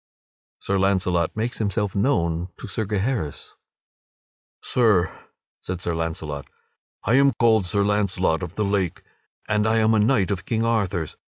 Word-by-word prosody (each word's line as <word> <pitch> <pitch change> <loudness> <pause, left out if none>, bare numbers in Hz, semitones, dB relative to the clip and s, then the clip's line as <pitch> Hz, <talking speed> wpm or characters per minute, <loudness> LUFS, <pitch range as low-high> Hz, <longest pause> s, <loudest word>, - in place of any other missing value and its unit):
[Sidenote: - - -22
Sir 100 0 +1
Launcelot 95 -3 +1
makes 115 +3 -2
himself 100 -2 -1
known 90 -7 +1
to - - -8
Sir 110 +2 -3
Gaheris] 105 - -2 1.1
"Sir," 105 -8 +2 0.4
said 90 -1 -5
Sir 85 -2 -2
Launcelot, 80 -3 -4 0.6
"I - - +1
am 140 +1 +5
called 110 -4 +3
Sir 100 +3 +1
Launcelot 100 -4 +1
of 90 -1 -6
the 105 - 0
Lake, 95 -3 -1 0.4
and 105 +1 +1
I 110 +1 +3
am 110 0 +3
a 110 - +3
knight 105 -3 +2
of 95 -1 -2
King 115 +2 -1
Arthur's. 100 -8 -1
100 Hz, 155 wpm, -23 LUFS, 90-110 Hz, 1.1 s, am